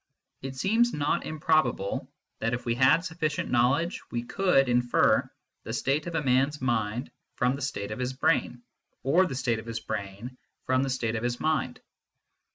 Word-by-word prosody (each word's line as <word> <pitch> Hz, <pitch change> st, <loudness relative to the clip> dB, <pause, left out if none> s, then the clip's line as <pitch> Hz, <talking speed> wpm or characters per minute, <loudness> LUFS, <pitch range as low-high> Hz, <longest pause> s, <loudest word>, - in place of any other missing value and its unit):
It 135 Hz, 0 st, -6 dB
seems 225 Hz, -, +2 dB
not 145 Hz, 0 st, 0 dB
im 155 Hz, -, -5 dB
probable 140 Hz, -11 st, +1 dB, 0.3 s
that 115 Hz, +3 st, 0 dB
if 120 Hz, -, -8 dB
we 120 Hz, -, +1 dB
had 130 Hz, +8 st, +4 dB
sufficient 160 Hz, -3 st, -2 dB
knowledge 135 Hz, +8 st, +2 dB
we 120 Hz, 0 st, -3 dB
could 160 Hz, -2 st, +2 dB
infer 120 Hz, 0 st, +3 dB, 0.3 s
the -, -, -6 dB
state 145 Hz, +4 st, 0 dB
of 170 Hz, -, -4 dB
a 160 Hz, -, 0 dB
man 130 Hz, 0 st, +3 dB
s 145 Hz, 0 st, -8 dB
mind 120 Hz, -1 st, -1 dB, 0.2 s
from 125 Hz, +2 st, +1 dB
the 140 Hz, -, -8 dB
state 105 Hz, -7 st, -3 dB
of 105 Hz, -, -5 dB
his 125 Hz, +1 st, -2 dB
brain, 125 Hz, -2 st, 0 dB, 0.4 s
or 170 Hz, +8 st, +4 dB
the 135 Hz, -, -5 dB
state 120 Hz, -3 st, 0 dB
of 110 Hz, -, -10 dB
his 115 Hz, 0 st, -3 dB
brain 110 Hz, +3 st, -6 dB, 0.3 s
from 130 Hz, 0 st, +2 dB
the 135 Hz, -, -1 dB
state 120 Hz, -3 st, -1 dB
of 110 Hz, -, -2 dB
his 120 Hz, 0 st, -1 dB
mind. 155 Hz, -5 st, -1 dB
130 Hz, 185 wpm, -27 LUFS, 120-150 Hz, 0.4 s, had